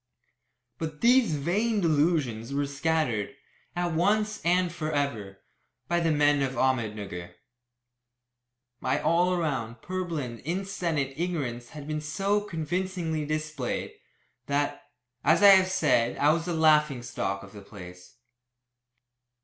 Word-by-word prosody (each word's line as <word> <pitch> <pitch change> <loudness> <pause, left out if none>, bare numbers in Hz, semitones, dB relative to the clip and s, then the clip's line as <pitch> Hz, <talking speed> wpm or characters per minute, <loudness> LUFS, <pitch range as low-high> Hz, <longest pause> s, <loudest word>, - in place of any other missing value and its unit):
But 155 -2 -5
these 240 -8 +4
vain 205 +10 0
delusions 145 - +1
were 145 0 +1
scattered, 140 -5 -1 0.4
at 175 0 -1
once 210 +5 +1
and 180 +1 +2
for 155 -2 -3
ever, 110 -10 -2 0.5
by 175 0 +1
the 165 -1 +1
men 145 -1 +3
of 135 -1 0
Ahmednugger. 105 -9 -2 1.4
My 130 - 0
all 180 +2 +2
round, 125 -8 -3
purblind, 165 -10 -4
insensate 170 -4 -2
ignorance 135 -9 -3
had 145 -1 -8
been 155 0 -2
so 195 +7 0
convincingly 170 -3 -3
displayed, 155 -4 -3 0.5
that, 145 0 -1 0.3
as 165 +5 +4
I 200 - +10
have 190 -1 +7
said, 150 -10 +2
I 145 +1 +4
was 165 +1 0
the 175 - -2
laughing 150 -5 +3
stock 100 -5 -3
of 100 - -13
all 105 - -9
the 100 - -19
place. 90 0 -12
155 Hz, 125 wpm, -27 LUFS, 130-175 Hz, 1.4 s, I